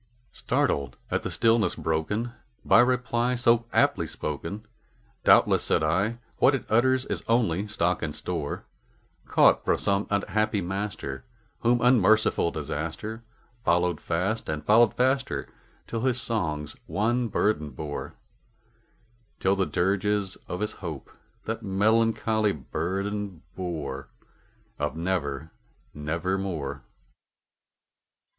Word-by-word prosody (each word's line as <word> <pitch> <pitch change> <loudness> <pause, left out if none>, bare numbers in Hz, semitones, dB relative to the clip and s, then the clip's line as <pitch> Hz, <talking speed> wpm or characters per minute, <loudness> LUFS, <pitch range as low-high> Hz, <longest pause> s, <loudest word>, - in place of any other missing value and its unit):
Startled 70 -3 -1
at - - +1
the - - -4
stillness 115 -1 +3
broken 90 +9 -1 0.3
by - - +6
reply 125 0 +2
so 120 -1 +3
aptly - - +2
spoken, 85 +8 -5 0.6
"Doubtless," - - +5
said - - +1
I, 100 +9 +1 0.2
"what 135 - +5
it 130 - -4
utters 130 +4 +3
is - - -2
its - - -22
only 105 -5 +2
stock 90 -4 0
and 75 -3 -3
store, - - -4 0.6
Caught - - +5
from - - +2
some 100 +1 0
unhappy 105 +1 0
master 95 -8 -4 0.4
whom 120 +1 +2
unmerciful 110 -7 +4
Disaster 80 +9 -4 0.4
Followed 85 -2 +2
fast 95 +7 -1
and 75 -1 -3
followed 110 +1 +5
faster 130 +2 +1 0.4
till 115 - -4
his 125 -1 +1
songs 80 -11 -1
one 120 +4 +1
burden 105 -7 0
bore 75 +2 -6 1.2
Till 95 +1 +2
the 95 -1 0
dirges 100 +1 0
of 90 - -4
his 105 - -1
Hope 80 -7 -7 0.3
the - - -3
melancholy 110 +1 +2
burden 95 +6 -3
bore 75 -7 -4 0.7
Of 75 +2 -2
'Never 80 -4 -2 0.4
nevermore.'" 85 +1 -2
100 Hz, 115 wpm, -27 LUFS, 80-115 Hz, 1.2 s, by